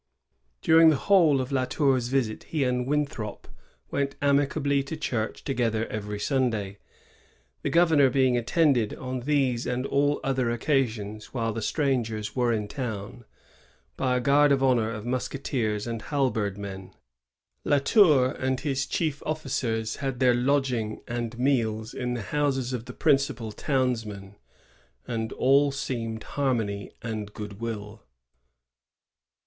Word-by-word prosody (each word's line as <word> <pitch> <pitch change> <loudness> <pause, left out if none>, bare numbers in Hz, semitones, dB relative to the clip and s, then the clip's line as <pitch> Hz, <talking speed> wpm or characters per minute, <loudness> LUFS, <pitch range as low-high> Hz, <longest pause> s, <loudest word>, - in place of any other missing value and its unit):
During 160 0 +7
the 155 - +4
whole 165 -3 +4
of 130 +1 -3
La 130 -2 +1
Tour's 130 -3 +1
visit 125 -4 -1
he 155 -4 -1
and 125 -1 0
Winthrop 140 -8 -2 0.4
went 140 -1 -1
amicably 140 0 +2
to 135 +4 -6
church 115 -7 -3
together 115 -4 0
every 105 -1 -4
Sunday, 110 -6 -1 0.4
— 60 +2 -36
the - - -1
governor 160 -3 +5
being 130 -1 +3
attended, 120 -1 +2
on 130 0 -4
these 130 -3 0
and 125 +1 -1
all 145 +1 +1
other 130 -3 0
occasions 115 -4 -1
while 115 -2 -1
the 115 - -4
strangers 115 -7 -1
were 125 -2 +2
in 105 -2 -1
town, 120 -1 -6 0.7
by 130 -1 +1
a - - +1
guard 140 +3 +4
of 135 -1 +3
honor 120 -4 +3
of 110 -1 -6
musketeers 120 -4 -2
and 115 -1 -4
halberd 115 -9 -1
men. 95 -2 -8 0.7
La 145 - +3
Tour 140 - +5
and 130 0 -2
his 140 -2 -1
chief 155 -4 -1
officers 125 -7 -2
had 135 -3 -3
their 125 -2 +5
lodging 125 -4 0
and 120 -1 -4
meals 115 -4 0
in 125 -1 -2
the 115 - -4
houses 135 -1 -1
of 120 -2 -4
the 125 - -8
principal 135 -7 +1
townsmen, 110 -6 -2 0.7
and 110 -1 -3
all 140 +2 +4
seemed 115 -5 -4
harmony 115 -8 -1
and 110 -3 -5
good 105 -1 -7
will. 110 -2 -5
125 Hz, 140 wpm, -26 LUFS, 110-140 Hz, 0.7 s, During